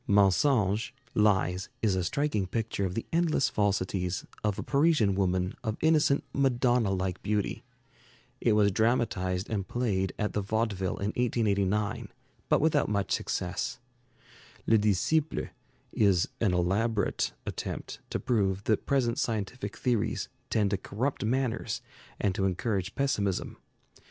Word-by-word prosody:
'Mensonges' 105 +2 +3 0.2
(Lies) 95 -3 +2
is 105 -4 +3
a 90 - 0
striking 105 -1 0
picture 110 -1 -2
of 90 -1 -3
the 115 - -2
endless 165 -5 +2
falsities 95 -3 0 0.2
of 105 -2 0
a - - -3
Parisian 140 -8 +3
woman 95 -1 0
of 110 0 -2
innocent 155 -3 +3
Madonna 125 -4 +2
like 95 -1 -2
beauty. 105 -1 -1 0.8
It 115 - +3
was 105 -1 +4
dramatized 95 -4 +1
and 100 -4 -2
played 100 -6 0
at 105 - -1
the 105 - 0
Vaudeville 100 -2 -1
in 100 - -1
1889, 105 -3 0 0.4
but - - +4
without 150 -2 +2
much 100 -3 -1
success. 90 0 -2 0.9
'Le 110 - +4
Disciple' 110 - +1 0.4
is 95 -5 +3
an 105 -5 +2
elaborate 100 +5 0
attempt - - -5
to - - -2
prove 100 -5 0
that 110 -1 0
present 125 -4 +1
scientific 115 +3 -3
theories 115 -4 0 0.2
tend 105 -3 +1
to 100 - +1
corrupt 125 +9 -2
manners 120 -1 -1 0.4
and 100 -3 +1
to 95 -1 0
encourage 95 0 -1
pessimism. 105 -9 0
105 Hz, 130 wpm, -29 LUFS, 95-120 Hz, 0.9 s, was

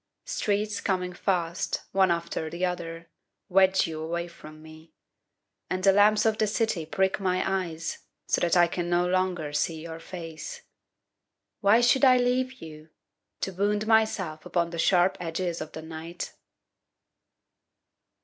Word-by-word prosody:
Streets 210 - -1
coming 180 -2 -1
fast, 175 -1 -1
One 190 -1 +4
after 170 -2 -2
the 170 +3 -1
other, 170 -2 -5 0.4
Wedge 190 0 +4
you 160 -1 -5
away 170 +2 -3
from 155 -2 -13
me, 160 +1 -14 0.8
And 185 0 -2
the 195 - +7
lamps 210 +2 +4
of 220 -1 +2
the 215 - +3
city 205 -7 -1
prick 190 +4 +1
my 185 -2 +1 0.2
eyes 160 -1 -5 0.3
So - - 0
that 175 0 +3
I 175 - +7
can 175 0 -3
no 175 0 +2
longer 180 -4 0
see 160 +2 0
your 165 0 -7
face. 175 - -8 1.0
Why 215 +3 +5
should 250 +3 +4
I 255 -2 +7
leave 255 +1 0
you, 155 0 -11 0.5
To 190 - -2
wound 205 +3 0
myself 215 -8 +1
upon 170 -1 -1
the 170 - -5
sharp 180 +2 +3
edges 170 0 -3
of 155 - -7
the 160 - -7
night? 165 +2 -7
180 Hz, 150 wpm, -27 LUFS, 165-200 Hz, 1.0 s, the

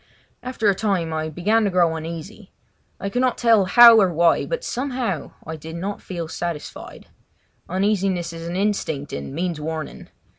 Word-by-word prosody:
After 250 -3 -2
a 200 - +5
time 190 -5 -1
I 155 0 -2
began 205 +8 +1
to - - +2
grow 175 -3 +2
uneasy. 170 +6 -8 0.5
I - - -4
could 245 +5 -1
not 255 -2 +1
tell 225 -5 +4
how 235 +2 +8
or 190 -2 +3
why, 170 0 +2
but - - -3
somehow 250 - -3
I 160 - -5
did 160 +1 -9
not 195 +4 -4
feel 170 -3 -5
satisfied. 165 -1 -6 0.6
Uneasiness 190 -2 0
is 165 0 -7
an 170 - -4
instinct 185 -8 -2
and 70 0 -5
means 165 +1 -3
warning. 160 0 -6
180 Hz, 165 wpm, -22 LUFS, 160-210 Hz, 0.6 s, how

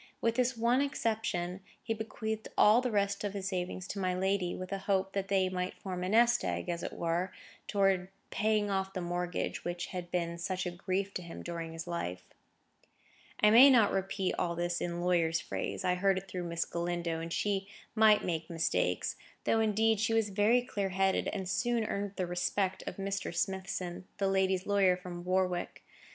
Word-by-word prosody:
With 230 - +1
this 250 +1 +1
one 240 +3 +3
exception, 215 -9 -1 0.2
he 225 - -1
bequeathed 220 0 -4
all 215 +4 +6
the 255 - -1
rest 200 -2 0
of 205 -1 -3
his 195 -1 -2
savings 185 -1 -3
to 200 - -4
my 185 -1 0
lady, 190 -1 0
with 185 +1 -7
a 195 - -2
hope 195 -1 0
that 195 -1 -1
they 195 -1 +2
might 185 0 -3
form 180 -2 -5
a 185 - -1
nest 240 +3 +4
egg, - - -2
as 170 0 -2
it - - -4
were, 170 +3 -1 0.4
towards 195 -3 +2
the - - -21 0.2
paying 210 -1 +1
off 190 0 0
of 190 - -22
the 185 - -3
mortgage 175 0 -2
which 175 0 -3
had 180 -1 -5
been 170 -1 -2
such 185 +1 -2
a 180 - -2
grief 190 +2 -2
to - - -3
him 170 -1 -8
during 170 -1 -5
his 165 0 -6
life. 90 - -4 1.2
I 210 - +6
may 250 +5 +10
not 230 -6 +5
repeat 195 0 -1
all 170 -1 0
this 175 0 -1
in 175 0 -2
lawyer's 170 -2 +2
phrase; - - -4
I 180 - +3
heard 190 +1 +2
it 190 +1 -5
through 180 -1 -4
Miss 170 0 -1
Galindo, 170 -1 -2
and 165 +1 -5
she 195 +1 0 0.3
might 215 -1 +5
make 160 -2 -2
mistakes. 165 -1 0 0.3
Though, 225 - +2
indeed, 220 0 +3
she 220 +1 +1
was 220 -2 +2
very 215 +5 +3
clear 200 -5 -2
headed, 190 +1 +1
and 190 -3 -3
soon 235 +3 +1
earned 200 -1 -3
the 185 - -1
respect 185 +2 -1
of - - -4
Mr. 195 0 -3
Smithson, 185 -1 -3
my 200 - +1
lady's 190 -1 +2
lawyer 195 -3 +3
from 180 -1 -7
Warwick. 180 -1 -1
190 Hz, 195 wpm, -32 LUFS, 175-205 Hz, 1.2 s, may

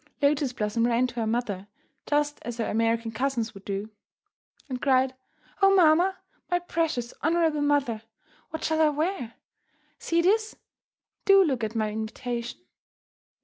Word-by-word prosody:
Lotus 285 -2 +2
Blossom 230 0 0
ran 240 +1 +2
to 245 -2 -6
her 225 - 0
mother, 220 -4 -2 0.4
just 295 0 +1
as 240 -1 -6
her 230 - -1
American 230 +1 0
cousins 245 -2 -1
might 195 0 -13
do, 200 +2 -4 0.8
and 255 -3 -5
cried, 260 -1 +3 0.5
"Oh, 390 0 +6
mamma, 355 +2 +4 0.3
my 355 - +3
precious, 325 -8 -2
honourable 320 -1 +2
mother, 285 -7 +1 0.5
what 320 - -6
shall 315 0 +1
I 310 - +5
wear? 300 - -2 0.6
See 335 0 +1
this; 430 +4 +2 0.7
do 390 -1 +7
look 265 -9 -1
at 220 +1 -3
my 215 -1 0
invitation." 235 +4 -4
260 Hz, 145 wpm, -26 LUFS, 230-315 Hz, 0.8 s, do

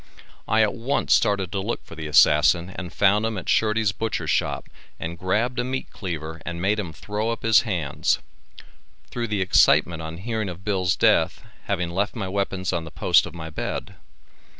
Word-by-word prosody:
I 110 0 +4
at 105 - +1
once 125 +5 0
started 95 -3 +2
to 100 - -2
look 115 +5 -4
for - - -12
the 80 -1 -6
assassian 80 +3 +4
and 90 -2 -7
found 105 +1 +3
him 110 -2 -1
at 95 - -6
Shurdy's 110 -1 +2
butcher 110 +1 -3
shop - - -1 0.3
and 85 +1 -4
grabbed 110 +8 -1
a - - +1
meat 130 +1 -4
cleaver 80 -4 -6
and 85 -1 -5
made 100 +4 +1
him 90 -6 -4
throw 105 +7 -3
up 115 - -4
his 110 -1 +5
hands; 85 - 0 0.9
through 120 -1 -3
the 105 -3 -1
excitement 85 -3 +4
on 80 +1 -6
hearing 110 +1 -3
of 90 +2 -9
Bill's 95 -4 +1
death, - - +2 0.2
having 85 -1 -1
left 100 +4 -1
my 105 -5 -3
weapons 95 -1 -2
on 85 -2 -1
the 80 - -8
post 85 +2 +3
of - - -11
my 80 -1 -7
bed. - - -4
95 Hz, 190 wpm, -24 LUFS, 85-110 Hz, 0.9 s, his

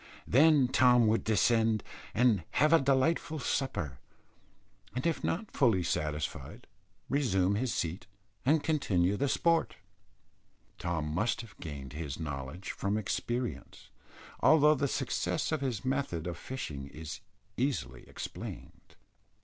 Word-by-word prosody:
Then 145 +1 +5
Tom 125 -2 +5
would 110 +1 +2
descend, 110 0 +2 0.3
and 115 -6 +3
have 155 +2 +4
a 165 - +6
delightful 140 +4 +1
supper, 105 - -2 1.0
and 125 - -2
if 165 -2 0
not 200 +6 -2
fully 115 - +3
satisfied 75 -4 -3 0.4
resume 100 -9 +2
his 120 +4 0
seat 85 0 -3 0.4
and 150 +4 +3
continue 100 - +1
the 140 +6 0
sport. 165 +3 +2 1.0
Tom 85 -3 -2
must 110 +10 0
have 115 -2 -13
gained 70 -4 -7
his 75 -3 -5
knowledge 70 +3 -5
from 100 +2 -1
experience, 120 +3 -4 0.5
although 150 -1 +6
the 140 -1 0
success 140 +3 -1
of 155 -3 -1
his 125 -5 -2
method 130 - -1
of 85 -1 -3
fishing 75 - -6
is 80 +3 -8 0.4
easily 135 +2 -2
explained. - - -8
115 Hz, 125 wpm, -31 LUFS, 85-140 Hz, 1.0 s, a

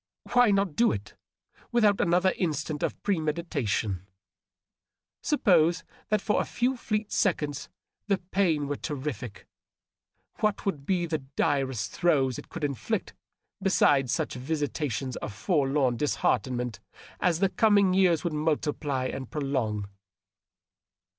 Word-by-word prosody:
Why 245 -2 +6
not 195 -5 +1
do 235 - +4
it, 100 -1 -5 0.6
without 215 -4 +3
another 180 +2 +3
instant 155 -3 -2
of - - -2
premeditation? 150 - -1 1.1
Suppose 175 - +3 0.3
that 215 - +2
for 210 - +1
a - - -2
few 250 +2 0
fleet 215 -3 -2
seconds 150 -7 0 0.4
the 200 -2 +2
pain 175 -6 0
were 145 0 -2
terrific; 130 - -5 0.9
what 210 -1 0
would 150 -9 -2
be 180 -2 +1
the 160 -2 -2 0.2
direst 135 -8 0
throes 135 -7 +2
it - - -12
could 170 - -7
inflict 140 -5 -2 0.5
beside 145 -9 +3
such - - -1
visitations 140 -2 -2
of - - -5
forlorn 135 - +1
disheartenment 125 -4 0 0.4
as 170 -3 +2
the 195 +2 +2
coming 200 -3 +4
years 185 -4 +3
would 170 -3 -1
multiply 150 -3 -1
and 130 -1 -4
prolong? 125 -9 -2
150 Hz, 120 wpm, -28 LUFS, 135-185 Hz, 1.1 s, Why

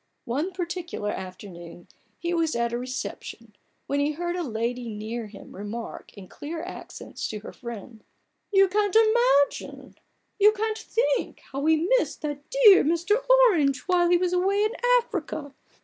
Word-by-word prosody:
One 290 +10 -2
particular 345 - -4
afternoon 180 -2 -9 0.3
he 345 0 -2
was 325 -4 0
at 235 0 0
a - - 0
reception, 255 +1 -6 0.3
when 280 - -1
he 290 +1 +1
heard 345 +3 -3
a 360 - -2
lady 240 -2 -3
near 220 +2 -5
him 205 -1 -13
remark 210 +4 -7
in 190 -2 -10
clear 320 - -7
accents 365 - -7
to 210 -1 -6
her - - -9
friend: 230 -2 -9 0.2
" - - -50
You 390 -1 +6
can't 410 +1 0 1.8
think 470 +3 -1
how 270 - -4
we 315 +3 +2
missed - - -5
that 290 -1 -5
dear 460 -6 +7
Mr. 345 +9 +1
Orange 365 - +5
while 355 -2 +2
he 350 - +5
was 360 0 0
away 390 +3 +2
in 430 - +1 0.3
Africa 315 - -5
305 Hz, 150 wpm, -26 LUFS, 235-365 Hz, 1.8 s, dear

